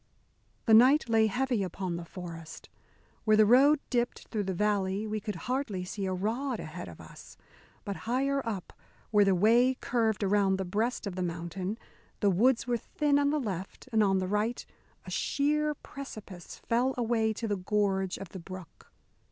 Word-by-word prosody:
The 225 - +4
night 255 +7 +6
lay 220 -1 +4
heavy 245 +1 0
upon 185 -1 -3
the 170 0 -6
forest. 165 -2 -9 0.5
Where 215 -1 +4
the 215 - +7
road 275 +7 +6
dipped 240 -1 -1
through 210 -2 -2
the 190 - -1
valley 205 0 0
we 215 0 -2
could 210 0 -5
hardly 250 -8 -2
see 195 +1 -4
a - - -1
rod 225 +7 -2
ahead 155 - -7
of 85 -2 -11
us. - - -13 0.5
But 200 -1 -4
higher 275 +3 +1
up 210 -6 -5 0.4
where 210 -1 +5
the 195 -1 +3
way 235 +7 +4
curved 225 -4 0
around 200 -1 +3
the 190 - -3
breast 220 +7 -1
of 195 -3 -4
the 185 - -3
mountain, 180 +4 -3 0.4
the 200 -2 +3
woods 235 +7 +3
were 245 -1 0
thin 285 +4 +1
on 285 0 +2
the 300 +1 +1
left, 195 -2 -5
and 220 -1 +3
on 195 -1 +3
the 185 -1 -1
right 210 +4 -1 0.4
a - - -8
sheer 300 +1 +1
precipice 215 - -9
fell 250 +3 0
away 225 -2 +1
to 225 +2 -4
the 205 -1 0
gorge 190 -1 0
of 195 - -8
the 190 - -8
brook. 185 -1 -11
210 Hz, 180 wpm, -30 LUFS, 190-245 Hz, 0.5 s, the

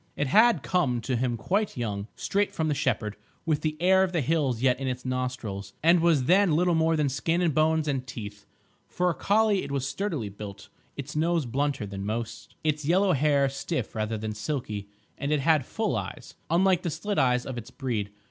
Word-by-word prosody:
It 145 - 0
had 225 - +4
come 140 -10 +1
to 125 +3 -1
him 120 0 0
quite 195 - -1
young, 105 -4 -3
straight 205 +1 0
from 160 -1 0
the - - +2
shepherd, 110 -6 -1 0.3
with 155 -3 +1
the 155 -1 -2
air 190 +2 +5
of 190 -1 +1
the 170 - +1
hills 140 -4 +1
yet 125 0 +2
in 135 - -3
its 125 0 -4
nostrils, 125 -6 -3
and 170 +2 +6
was 165 -5 +3
then 180 +2 +4
little 175 +2 +3
more 160 0 +3
than 150 -2 +1
skin 160 +5 0
and 170 -4 +2
bones 155 +1 +2
and 135 -3 -2
teeth. 105 -5 -8 0.4
For 180 0 0
a - - -2
collie 210 +2 +2
it - - -6
was 135 -1 -1
sturdily 155 - -3
built, 100 0 -9 0.3
its 140 +1 -6
nose 165 0 +1
blunter 140 -1 -1
than 100 -1 -6
most, 110 +2 -5
its 155 -1 0
yellow 185 +5 +3
hair 140 0 +3
stiff 140 +4 -3
rather 110 0 -2
than 110 0 -4
silky, 105 -3 -4 0.3
and 140 +1 -2
it 150 -2 +2
had 150 -2 +3
full - - -1
eyes, - - -6 0.2
unlike 180 +2 +3
the 175 - -2
slit 205 +6 -2
eyes 125 -1 +2
of 130 -3 -4
its 120 +2 -10
breed. 120 -7 -3
140 Hz, 205 wpm, -27 LUFS, 120-170 Hz, 0.4 s, and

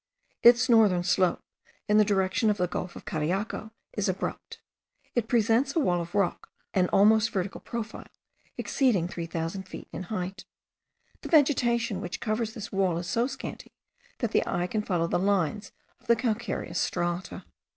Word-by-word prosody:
Its 240 +1 +7
northern 215 -7 +5
slope, 180 0 +2 0.4
in 210 +1 +4
the - - +7
direction 200 +3 +1
of 210 - +1
the 180 - +1
gulf 180 0 -5
of - - -10
Cariaco, 190 +7 -2 0.2
is 205 -2 -1
abrupt. 185 - -4 0.5
It 235 -3 0
presents 235 +4 +2
a - - +3
wall 175 - +1
of 170 +2 -8
rock, 200 -3 0 0.2
an 185 -2 +3
almost 220 +2 +5
vertical 190 -3 -3
profile, 225 -2 -6 0.5
exceeding 225 -11 +1
3000 170 +2 -4
feet - - -9
in - - -6
height. 185 -1 -5 0.8
The - - -7
vegetation 240 - +3
which 175 -2 -5
covers 220 0 -2
this 210 -3 -7
wall 190 -3 +1
is 170 - -4
so 235 +6 +1
scanty, - - -8 0.4
that - - -2
the - - +3
eye 175 - 0
can 210 +4 -1
follow 180 -5 0
the 170 - 0
lines 200 +1 0 0.3
of - - -26
the 235 - +5
calcareous 230 -1 -2
strata. 175 +1 -2
205 Hz, 160 wpm, -28 LUFS, 180-230 Hz, 0.8 s, Its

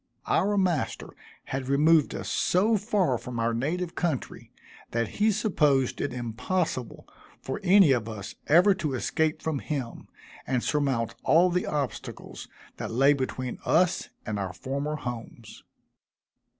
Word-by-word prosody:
Our 205 +4 +1
master 180 -7 0 0.3
had 130 -1 -4
removed 150 +2 +4
us - - -5
so 210 +6 +2
far 195 - +1
from 125 -1 -7
our 115 0 +1
native 165 +9 -2
country, 165 -8 -3 0.4
that 115 -1 -1
he 215 +1 +4
supposed 150 - +1
it 145 - -1
impossible 125 +4 -3 0.3
for 130 - -5
any 190 -4 +6
of 115 -4 +1
us 100 -3 -7
ever 180 +7 +6
to 155 -8 -3
escape 155 +4 -1
from 155 -3 -1
him, 130 -6 -5 0.4
and 125 -2 0
surmount 135 -6 0
all 175 +3 +4
the 180 +1 0
obstacles 140 -7 -5 0.3
that - - -4
lay 135 +5 +4
between 130 -2 -4
us 180 0 +2 0.2
and 110 -2 -3
our 95 -2 -3
former 140 +10 -3
homes. 120 -4 -8
145 Hz, 135 wpm, -27 LUFS, 125-180 Hz, 0.4 s, any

